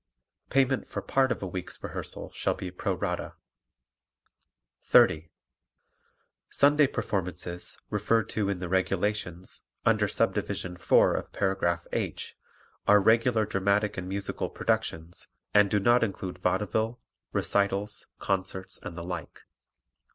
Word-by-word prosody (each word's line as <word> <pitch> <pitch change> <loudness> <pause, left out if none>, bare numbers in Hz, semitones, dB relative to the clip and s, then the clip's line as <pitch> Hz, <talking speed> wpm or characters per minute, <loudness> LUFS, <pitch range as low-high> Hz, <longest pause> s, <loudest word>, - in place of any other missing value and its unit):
Payment 135 -1 +2
for - - -5
part 135 -2 +2
of - - -2
a - - -2
week's 90 0 -6
rehearsal - - -5
shall - - -1
be 90 - -6
pro 90 - -2
rata. - - -3 1.5
30. 80 +1 +4 1.2
Sunday 145 +1 +5
performances, 90 -5 -3
referred 105 +1 +1
to 105 -2 -1
in 100 - -1
the 90 0 -4
"Regulations," 95 0 -1 0.2
under - - +3
Subdivision 90 -1 -1
4 - - +4
of - - -4
paragraph 85 -3 0
"H" - - -3 0.5
are 105 0 +7
regular 110 +2 +3
dramatic 100 +2 +1
and 95 0 -5
musical 100 +1 -3
productions 80 +2 -2 0.3
and 105 -1 +6
do 105 - +2
not 120 +4 +4
include 95 -4 -3
vaudeville, 110 +5 0 0.3
recitals, 100 +1 0
concerts 95 -1 -2
and 85 - -7
the 85 - -5
like. 90 -2 -6
100 Hz, 120 wpm, -28 LUFS, 90-105 Hz, 1.5 s, are